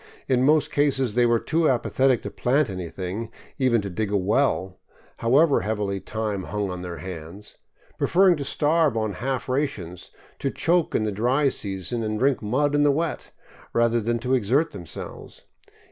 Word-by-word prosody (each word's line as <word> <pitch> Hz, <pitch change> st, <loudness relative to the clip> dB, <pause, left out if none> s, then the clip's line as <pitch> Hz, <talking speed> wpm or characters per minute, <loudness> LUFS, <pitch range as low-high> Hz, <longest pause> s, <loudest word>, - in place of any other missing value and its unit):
In 125 Hz, -1 st, +2 dB
most 150 Hz, +3 st, +3 dB
cases 135 Hz, -5 st, +1 dB
they 120 Hz, +1 st, +3 dB
were 120 Hz, 0 st, +3 dB
too 160 Hz, +6 st, +1 dB
apathetic 130 Hz, 0 st, +1 dB
to -, -, -5 dB
plant 130 Hz, -1 st, +1 dB
anything, 95 Hz, +4 st, -5 dB, 0.3 s
even 125 Hz, -4 st, +3 dB
to 100 Hz, -, -5 dB
dig 105 Hz, +3 st, -2 dB
a 105 Hz, -, +2 dB
well, 95 Hz, -2 st, 0 dB, 0.4 s
however 140 Hz, +6 st, +4 dB
heavily 105 Hz, -2 st, -2 dB
time 105 Hz, -2 st, -3 dB
hung 105 Hz, -2 st, -3 dB
on 90 Hz, 0 st, -6 dB
their 90 Hz, -2 st, -6 dB
hands, 90 Hz, +3 st, -9 dB, 0.4 s
preferring 185 Hz, 0 st, +4 dB
to 145 Hz, -, -3 dB
starve 150 Hz, -2 st, +2 dB
on 110 Hz, -2 st, -1 dB
half 130 Hz, +6 st, -3 dB
rations, 115 Hz, -, -3 dB, 0.3 s
to 140 Hz, -, -1 dB
choke 170 Hz, +3 st, +1 dB
in -, -, +2 dB
the 105 Hz, -, -1 dB
dry 125 Hz, +8 st, +2 dB
season 100 Hz, 0 st, -2 dB
and 110 Hz, -1 st, -2 dB
drink 135 Hz, +3 st, +1 dB
mud 135 Hz, +7 st, 0 dB
in 145 Hz, -, +3 dB
the 145 Hz, -, +4 dB
wet, 160 Hz, +3 st, -2 dB, 0.4 s
rather 115 Hz, 0 st, +2 dB
than 115 Hz, +2 st, 0 dB
to 125 Hz, +3 st, -2 dB
exert 130 Hz, +7 st, +2 dB
them 90 Hz, -, -9 dB
selves. -, -, -9 dB
120 Hz, 175 wpm, -24 LUFS, 100-140 Hz, 0.4 s, however